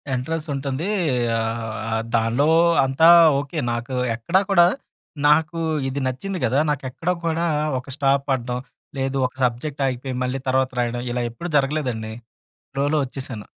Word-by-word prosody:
Entrance 155 +6 -3
ఉంటుంది. 135 +4 -3 0.5
ఆహ్, 110 0 -3
దానిలో 115 +6 +2 0.4
అంతా 135 +5 +4 0.3
ఓకే 145 +3 -6
నాకు 120 +2 -4 0.2
ఎక్కడా 170 +12 +1
కూడా 175 -3 +7 0.6
నాకు 155 +2 +3 0.3
ఇది 135 +1 -3
నచ్చింది 185 +10 -4
గదా! 135 - +2
నాకు 145 -2 -1
ఎక్కడా 165 +7 -2
కూడా 165 +1 0 0.3
ఒక 130 - -13
స్టాప్ 140 -1 +2
పడడం, 125 -2 -1 0.4
లేదు 135 0 -1
ఒక 125 - -17
సబ్జెక్ట్ 130 +4 -1
ఆగిపోయి 130 0 -3
మళ్ళీ 125 +1 -2
తర్వాత 130 0 +2
రాయడం, 120 0 -1
ఇలా 120 0 -1
ఎప్పుడూ 170 +10 -7
జరగలేదండి. 130 -6 -1 0.6
ఫ్లో‌లో 145 +3 +1
వచ్చేసాను. 130 -5 -7
135 Hz, 135 wpm, -22 LUFS, 120-150 Hz, 0.6 s, కూడా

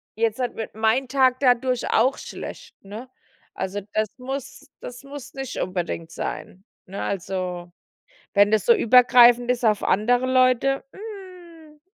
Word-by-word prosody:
jetzt 225 0 0
halt 250 - -2
wird 220 - -7
mein 225 +4 +1
Tag 260 -1 +2
dadurch 250 -1 +1
auch 255 +5 +2
schlecht, - - -9
ne? 220 +6 -9 0.5
Also, 200 +2 -4
das 215 0 +1
muss 270 +2 -7
das 245 +2 -10
muss 280 0 -10
nicht 270 -2 -6
unbedingt 175 -3 -4
sein. 155 +6 -6 0.2
Ne, 195 +2 -7
also, 180 -2 -4 0.6
wenn 205 +1 +4
das 215 - +1
so 470 - +6
übergreifend 245 - +5
ist 250 -1 0
auf 215 -2 +2
andere 245 +6 +1
Leute, 255 +1 +2
hm, 360 -7 -12
245 Hz, 140 wpm, -23 LUFS, 210-270 Hz, 0.6 s, so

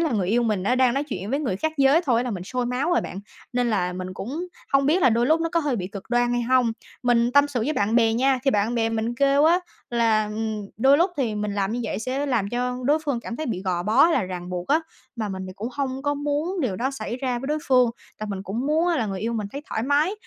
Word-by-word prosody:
là 320 -6 +1
người 195 -5 0
yêu 240 +4 +2
mình 210 -5 0
nó 245 +6 +2
đang 255 -1 +3
nói 280 +2 0
chuyện 205 -7 -5
với 280 - 0
người 220 -11 -1
khác 315 +8 -1
giới 275 +3 +5
thôi 240 -1 +2
là 250 - -2
mình 185 -4 -4
sôi 250 +4 -2
máu 250 +7 -1
rồi - - +3
bạn. 190 - -6 0.3
Nên 245 -1 +1
là 180 -4 0
mình 185 0 -6
cũng 285 - -5 0.3
hông 275 0 +4
biết 340 +5 +3
là 255 - +6
đôi 235 +2 +2
lúc 315 +4 +3
nó 330 - 0
có 335 0 +1
hơi 290 -5 -1
bị 185 -4 -3
cực 195 0 -8
đoan 240 0 +2
hay 240 0 0
hông? 245 -1 +3 0.3
Mình 240 -1 +2
tâm 285 +1 +5
sự 260 -4 -2
với 265 +8 0
bạn 210 -4 0
bè 225 -2 +4
nha, 260 +3 +2
thì 270 - +4
bạn 215 +1 +1
bè 225 -1 +1
mình 225 +1 -2
kêu 280 +2 +3
á 335 +3 +5 0.3
là, 225 -3 +2
ừm, 215 -1 -3
đôi 270 +6 +5
lúc 350 +3 +3
thì 245 -6 0
mình 210 -1 -2
làm 200 0 -1
như 245 - -2
vậy - - -3
sẽ 260 +6 -2
làm 230 -7 0
cho 250 +2 -2
đối 295 +4 +3
phương 275 -5 -1
cảm 235 0 -6
thấy 315 - -4
bị 190 -5 -3
gò 180 -2 -1
bó, 220 +8 +5
hay 335 - +4
là - - +2
ràng 180 -1 -6
buộc 180 0 -4
á, 310 +3 +4 0.4
mà 220 -2 -2
mình 190 -1 -5
thì 185 - -7
cũng 225 +4 -4
hông 270 -1 -3
có 290 0 0
muốn 295 +6 -2
điều 230 - -1
đó 260 +6 -1
xảy 270 -3 -5
ra 250 -2 -2
với 265 - -6
đối 300 +2 0
phương, 250 -2 +5 0.3
tại 215 - -4
mình 195 -1 -4
cũng 225 +7 -3
muốn 315 +4 +2
á 345 - +2
là 225 -6 0
người 195 -2 -4
yêu 230 +2 -1
mình 215 -3 -2
thấy 285 +1 -6
thoải 220 - -2
mái. 290 - +2
245 Hz, 295 wpm, -24 LUFS, 215-280 Hz, 0.4 s, là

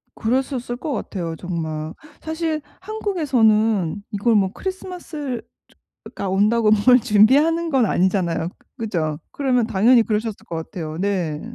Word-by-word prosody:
그러셨을 250 0 -1
것 305 +2 -4
같아요 170 -7 -4
정말. 160 -3 -4 0.3
사실 315 -1 -2 0.2
한국에서는 225 - +1
이걸 215 +3 +1
뭐 195 -2 +2
크리스마스를 345 - -5
즈 - - -36 0.7
가 195 - -3
온다고 215 +3 +3 0.2
뭘 250 0 +7
준비하는 280 +10 +4
건 255 -5 +3
아니잖아요. 175 -3 +1 0.3
그죠? 165 -10 -2
그러면 255 -4 +1
당연히 230 +3 +4
그러셨을 215 -1 -3
것 170 - -6
같아요. 160 -1 -5
네. 180 -6 -1
220 Hz, 305 characters per minute, -21 LUFS, 185-270 Hz, 0.7 s, 뭘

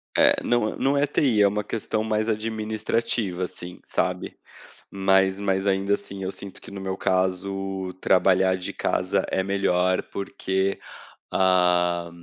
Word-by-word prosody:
É,não 120 -3 +3
não 140 +1 +1
é 145 - +3
TI, 130 -7 +2
é 100 - +7
uma 105 +1 -1
questão 110 +1 -2
mais 110 0 0
administrativa, 110 -2 -1
assim, 90 0 -7
sabe. - - -2 0.5
Mas 95 0 +2
mas 95 -1 0
ainda 100 +1 +1
assim 100 -1 -7
eu 95 - -2
sinto 100 -1 -9
que - - -12
no 100 - -7
meu 95 0 -3
caso 95 0 -1
trabalhar 95 0 +4
de 90 - -4
casa - - 0
é 95 - 0
melhor 95 -2 +1
porque, 95 0 -2 0.5
ah, 90 -2 +2
95 Hz, 135 wpm, -24 LUFS, 95-105 Hz, 0.5 s, é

